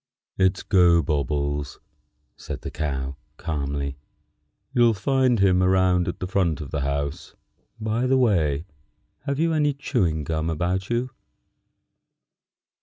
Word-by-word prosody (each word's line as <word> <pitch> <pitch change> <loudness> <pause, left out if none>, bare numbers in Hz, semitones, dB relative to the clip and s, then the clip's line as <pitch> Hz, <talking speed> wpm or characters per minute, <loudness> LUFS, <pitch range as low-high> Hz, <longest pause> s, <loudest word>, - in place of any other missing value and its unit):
"It's 95 -1 +2
Gobobbles," 75 -5 +2 0.6
said - - -7
the - - -6
Cow, 70 -3 -3 0.2
calmly. 70 -3 -3 0.8
"You'll 120 -3 +4
find 130 +3 +2
him 95 -2 +4
around 90 -1 +3
at 85 - -3
the - - -3
front 90 -5 0
of 75 - -7
the 75 - -2
house. 70 +1 -3 0.4
By 110 +3 0
the 135 +1 +3
way, 85 - +2 0.6
have 140 -1 -1
you 165 +1 +1
any 145 -2 +2
chewing 90 - 0
gum 80 +2 -2
about 90 +4 -1
you?" 120 +2 -1
90 Hz, 120 wpm, -24 LUFS, 75-115 Hz, 0.8 s, You'll